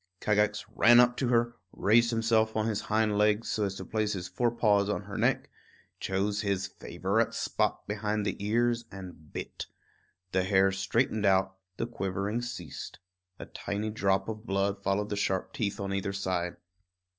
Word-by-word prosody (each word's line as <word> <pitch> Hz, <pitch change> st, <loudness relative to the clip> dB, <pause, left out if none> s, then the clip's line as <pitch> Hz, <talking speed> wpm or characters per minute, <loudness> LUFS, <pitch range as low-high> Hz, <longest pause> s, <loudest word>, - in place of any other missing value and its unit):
Kagax 105 Hz, 0 st, +1 dB
ran 120 Hz, +3 st, +7 dB
up 125 Hz, 0 st, +5 dB
to 130 Hz, -, 0 dB
her; 120 Hz, 0 st, +2 dB
raised 115 Hz, +3 st, +4 dB
himself 115 Hz, -1 st, +2 dB
on 110 Hz, -, +1 dB
his 110 Hz, -2 st, -1 dB
hind 105 Hz, -1 st, +1 dB
legs 105 Hz, +1 st, +2 dB
so 105 Hz, -, +1 dB
as 95 Hz, -1 st, -3 dB
to -, -, -7 dB
place 110 Hz, -1 st, -1 dB
his 90 Hz, -2 st, -4 dB
fore 120 Hz, +7 st, +1 dB
paws 105 Hz, -3 st, +2 dB
on 105 Hz, -, -1 dB
her 100 Hz, 0 st, -8 dB
neck; -, -, +1 dB, 0.5 s
chose 100 Hz, +2 st, -1 dB
his 100 Hz, -2 st, 0 dB
favorite -, -, -1 dB
spot -, -, -1 dB
behind 105 Hz, 0 st, -1 dB
the -, -, -1 dB
ears, 120 Hz, +2 st, +1 dB
and 90 Hz, -5 st, -10 dB
bit. -, -, -6 dB, 0.6 s
The 95 Hz, -, +2 dB
hare 95 Hz, 0 st, +4 dB
straightened 105 Hz, +3 st, +1 dB
out, 95 Hz, 0 st, +3 dB, 0.2 s
the -, -, -1 dB
quivering 100 Hz, 0 st, -2 dB
ceased. 110 Hz, -, -7 dB, 0.4 s
A -, -, -7 dB
tiny 105 Hz, +2 st, -4 dB
drop 95 Hz, -3 st, +1 dB
of 110 Hz, +1 st, -6 dB
blood 100 Hz, +1 st, 0 dB
followed 100 Hz, +1 st, 0 dB
the 105 Hz, -, -1 dB
sharp 95 Hz, -2 st, -1 dB
teeth 105 Hz, -3 st, -2 dB
on 100 Hz, -1 st, -2 dB
either 100 Hz, 0 st, -2 dB
side. 90 Hz, -3 st, -2 dB
105 Hz, 170 wpm, -29 LUFS, 95-110 Hz, 0.6 s, ran